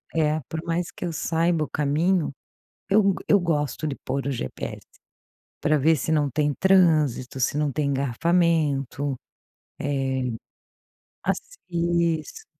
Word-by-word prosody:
É, 155 -1 +2
por 160 - -3
mais 170 0 -1
que - - -6
eu 170 - -2
saiba 165 0 +1
o - - -14
caminho, 155 +3 +1 0.6
eu 200 -1 +4 0.2
eu 200 - +6
gosto 155 -3 -1
de 140 - -3
pôr 135 0 -2
o 140 - 0
GPS 90 - -5 0.8
pra 150 0 +2
ver 160 +3 +4
se 145 - -3
não 150 -2 +2
tem 150 +2 +1
trânsito, 155 -10 +3
se 135 - +1
não 150 -1 +1
tem 150 +1 -1
engarrafamento, 140 0 +1 0.7
eh, 130 -3 -1 0.9
assim. - - -3 0.6
Isso. 455 -3 -11
155 Hz, 135 wpm, -25 LUFS, 140-170 Hz, 0.9 s, eu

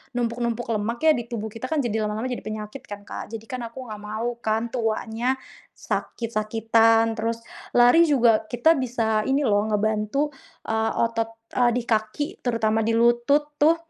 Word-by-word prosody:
numpuk-numpuk 235 -1 -1
lemak 225 +2 -1
ya 320 - +7
di 240 -2 -4
tubuh 225 -2 -4
kita 225 +4 -6
kan 315 +2 0
jadi 220 -2 -1
lama-lama 215 +4 -3
jadi 245 - -4
penyakit 215 +4 -6
kan, 205 0 -8
Kak. 220 - -7
Jadi 220 - -7
kan 250 0 -5
aku 250 +2 -9
enggak 210 - -6
mau 225 +3 -4
kan 225 +1 -1
tuanya 230 +1 -1 0.4
sakit-sakitan, 225 0 +1
terus 230 +1 -2 0.3
lari 245 +8 +6
juga 235 -7 +3
kita 255 +8 +3
bisa 225 -4 0
ini 270 +2 +2
loh 210 -6 +2
ngebantu, 215 +7 0 0.4
eee, 220 0 0 0.2
otot, 225 0 -2 0.3
eee, 245 -1 +4
di 245 0 -1
kaki 225 - -1
terutama 225 -2 +1
di 230 - +1
lutut 240 +6 +2
tuh, 330 +2 +2
230 Hz, 165 wpm, -24 LUFS, 220-245 Hz, 0.4 s, ya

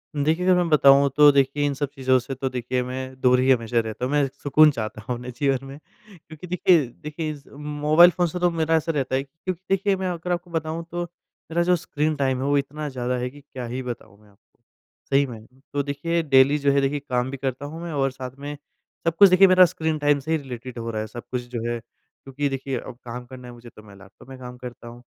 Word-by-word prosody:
देखिए, 155 +5 +1
अगर 185 0 +5
मैं 175 -1 +1
बताऊँ 140 -2 +6
तो 150 -1 +8
देखिए 140 +1 +2
इन 145 - 0
सब 140 0 -3
चीज़ों 130 -1 +3
से 125 +2 -6
तो 130 +1 -2
देखिए 125 0 -2
मैं 130 +1 -6
दूर 125 0 +4
ही 130 +1 +3
हमेशा 120 -1 +2
रहता 110 +2 -3
हूँ, 130 - -3
मैं 145 -1 +2 0.2
सुकून 150 +2 +6
चाहता 110 -4 -5
हूँ 125 +3 -4
अपने 125 +1 -7
जीवन 135 +1 -1
में, 135 +1 -9 0.4
क्योंकि 160 0 -12
देखिए, 175 -3 +3
देखिए 150 +6 -6
इज़ 145 -2 -11
मोबाइल 150 +3 +4
फ़ोन 175 0 0
से 180 +2 -5
तो 175 0 +3
मेरा 165 -1 +1
ऐसा 160 +1 0
रहता 135 -4 -1
है 135 - 0
क्योंकि 165 +5 -7
देखिए 195 +1 +2
मैं 190 0 -3
अगर 180 0 -4
आपको 175 0 -3
बताऊँ 160 0 -3
तो 175 0 -2 0.5
मेरा 170 +1 +2
जो 180 +1 +3
स्क्रीन 155 -2 -2
टाइम 135 -2 0
है 135 - -1
वो 145 0 +3
इतना 145 +2 -3
ज़्यादा 125 -1 -2
है 125 +1 -2
कि 145 +3 -15
क्या 130 -3 -8
ही 125 +2 -4
बताऊँ 120 -4 -8
मैं 105 - -22
आपको, 100 +2 -31 0.5
सही 140 +1 +4
में। 110 -3 -10 0.3
तो 145 0 0
देखिए 155 +4 -1
डेली 140 0 +5
जो 140 0 +2
है 140 0 +3
देखिए 140 +2 0
काम 125 +1 0
भी 135 - -5
करता 135 +1 -4
हूँ 160 +3 -7
मैं 170 - -5
और 135 -2 +1
साथ 130 -1 -7
में 145 +1 -6 0.5
सब 165 - +2
कुछ 200 +2 +8
देखिए 185 +2 +7
मेरा 185 0 +7
स्क्रीन 160 -2 -2
टाइम 145 -1 +3
से 150 +4 -6
ही 160 - +3
रिलेटेड 130 -3 -8
हो 115 0 -4
रहा 110 -1 -3
है, 110 - -5
सब 120 +2 -9
कुछ 125 -1 -1
जो 120 -2 -4
है 120 0 -2
क्योंकि 135 +4 -7
देखिए 135 -1 -3
अब 130 - -9
काम 125 +1 -7
करना 125 0 -11
है 120 - -10
मुझे 120 0 -13
तो 105 - -16
मैं 105 -2 -15
लैपटॉप 100 +6 -17
में 135 - -9
काम 125 -1 -9
करता 120 -1 -10
हूँ, 120 +1 -12
140 Hz, 250 wpm, -24 LUFS, 125-155 Hz, 0.5 s, तो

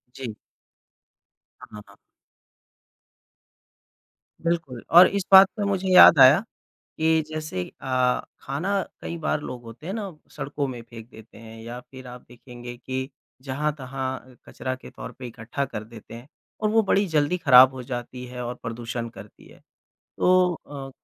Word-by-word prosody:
जी। 130 - -6 1.3
हाँ, 105 - -11
हाँ। 100 - -19 2.5
बिल्कुल, 165 -8 -2
और 175 +3 +9
इस 200 -1 -2
बात 190 0 +10
पे 210 - -1
मुझे 195 -1 -1
याद 170 -4 +9
आया, 130 +4 +8 0.6
कि 160 0 +3
जैसे 155 -12 -4 0.2
अ, 130 -1 +1 0.2
खाना 185 +9 -2 0.2
कई 170 - -6
बार 155 -2 -1
लोग 125 -4 -7
होते 115 +7 -12
हैं 190 - -4
ना 200 -7 -6
सड़कों 145 0 -4
में 125 -2 -6
फ़ेंक 115 -1 -12
देते 110 0 -15
हैं 115 0 -12
या 120 +2 -7
फिर 130 +1 -13
आप 125 0 -11
देखेंगे 120 0 -11
कि, 130 +2 -5 0.3
जहाँ-तहाँ 130 -2 -4
कचरा 130 0 -5
के 130 - -13
तौर - - -9
पे 130 - -7
इकट्ठा 120 +4 -4
कर 110 -5 -7
देते 115 0 -13
हैं। 120 +4 -12 0.3
और 215 - +1
वो 225 +1 +4
बड़ी 200 0 +2
जल्दी 155 +2 +1
खराब 130 -4 +7
हो 130 - -7
जाती 125 0 -6
है 125 0 -7
और 120 +1 -4
प्रदूषण 115 0 -5
करती - - -14
है। - - -18 0.6
तो 180 -1 +3
अ, 140 -4 -9
130 Hz, 155 wpm, -24 LUFS, 120-160 Hz, 2.5 s, बात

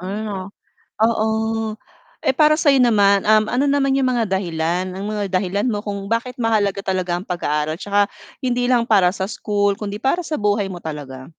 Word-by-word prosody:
Ano. 195 0 -5 0.5
Oo, 220 0 0 0.5
eh - - +2
para 305 +3 +4
sa 305 -3 +3
'yo 275 - +4
naman, 205 -5 +4
um, 215 0 +5
ano 260 +4 +1
naman 275 -1 +2
yung 265 - +2
mga 240 -3 +1
dahilan, 175 -1 -1
ang 190 - -6
mga 210 0 -2
dahilan 190 +3 -1
mo 205 -2 -2
kung 200 -2 -5
bakit 230 +4 -2
mahalaga 215 -4 +1
talaga 185 -2 -1
ang 185 - -10
pag-aaral 155 -3 -1
tsaka, 205 +2 +1 0.3
hindi 245 -1 0
lang 240 -2 +3
para 195 -6 +4
sa 190 0 -3
school 205 -1 0
kundi 205 0 -5
para 270 +9 0
sa 310 -2 -3
buhay 205 -1 0
mo 180 - -6
talaga? 140 -5 -7
205 Hz, 185 wpm, -20 LUFS, 190-230 Hz, 0.5 s, um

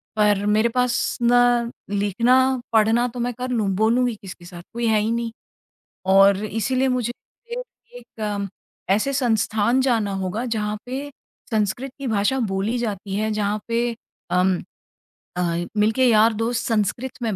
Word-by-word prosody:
पर 205 -1 +2
मेरे 215 +3 +3
पास 250 +1 0
ना 240 0 +3 0.2
लिखना, 240 +6 +2
पढ़ना 225 +2 +4
तो 245 +1 -8
मैं 245 +1 -1
कर 250 +2 -5
लूँ, 220 -5 0
बोलूँगी 235 +3 +2
किसके 180 -2 -10
साथ 175 -1 -10
कोई 235 0 -1
है 220 -1 +3
ही 215 +2 0
नहीं 235 0 -2 0.8
और 195 +1 +6
इसीलिए 250 +5 0
मुझे 250 -2 0 0.9
एक 215 -4 -4 0.4
ऐसे 215 +8 +2
संस्थान 230 -2 +1
जाना 225 -6 +1
होगा। 190 +5 -3
जहाँ 215 -3 -2
पे 270 +3 -5 0.4
संस्कृत 220 +5 -1
की 275 - -4
भाषा 220 +4 +1
बोली 210 +1 -1
जाती 200 -4 -3
है, 215 +1 0
जहाँ 210 0 -1
पे 235 0 0 0.4
अम 180 0 +2 0.8
अ, - - +1 0.4
मिलके 220 +5 +3
यार 225 -1 +5
दोस्त 225 +2 -1
संस्कृत 235 +4 -1
में 220 -3 -1
225 Hz, 145 wpm, -22 LUFS, 205-245 Hz, 0.9 s, और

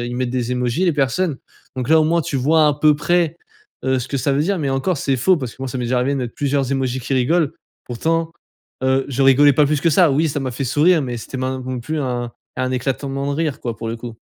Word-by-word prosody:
a - - -3
ils 120 0 -4
mettent 125 -1 -1
des 125 -1 -2
émojis, 125 +8 0
les 175 - +3
personnes. 145 +2 0 0.4
Donc 130 +1 -3
là, 160 0 +6
au 155 - +3
moins, 170 +1 +2
tu 140 - -3
vois 155 +4 +3
à 145 - +1
peu 150 0 +4
près, 170 +1 +1 0.5
heu, 130 0 +2
ce 125 - -4
que 140 - -2
ça 135 +2 0
veut 140 - +1
dire. 195 +2 0
Mais 140 -3 -1
encore, 135 +6 0
c'est 135 -1 0
faux 180 +9 +3
parce 130 -6 -5
que 130 - -10
moi, 135 - -3
ça 130 - -5
m'est 120 - -2
déjà 125 +1 0
arrivé 130 +3 +1
de 140 - -1
mettre 120 -2 -4
plusieurs 140 -2 0
émojis 130 -1 -1
qui 125 - -5
rigolent, 155 +4 +2 0.3
pourtant, 165 +7 -1 0.5
heu, 130 0 +2
je 135 0 -3
rigolais 140 +2 +6
pas 145 +1 +3
plus 150 -1 0
que 165 - +3
ça. 170 -1 +5
Oui, 155 +4 +2
ça 145 0 -2
m'a 130 - -3
fait 135 +3 -3
sourire, 150 +5 +3
mais 125 -2 -4
c'était 130 - -7
min 130 0 -2
non 130 -1 -3
plus 155 +5 -3
un 120 -3 -2 0.3
un 130 0 -1
éclatement 135 +2 -2
de - - -3
rire, 155 -4 -2
quoi 115 -3 -4
pour 115 +1 -5
le 115 - -3
coup. 115 -1 -8
135 Hz, 275 wpm, -20 LUFS, 125-155 Hz, 0.5 s, là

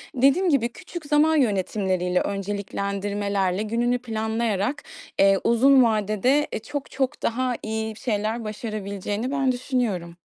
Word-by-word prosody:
Dediğim 275 +9 +4
gibi, 245 -5 +2
küçük 345 +4 -9
zaman 300 +2 +3
yönetimleriyle, 190 - +1
önceliklendirmelerle 200 -1 -2
gününü 240 +3 0
planlayarak, 220 +1 -1 0.4
eee, 195 0 +6
uzun 255 +3 +5
vadede, 220 +6 +2
eee, - - -1
çok, 280 +5 -6
çok 265 -1 -2
daha 250 +1 0
iyi 220 0 -3
şeyler 220 -1 -2
başarabileceğini 210 +1 -4
ben 270 -2 +2
düşünüyorum. 240 -9 -2
220 Hz, 115 wpm, -24 LUFS, 200-255 Hz, 0.4 s, eee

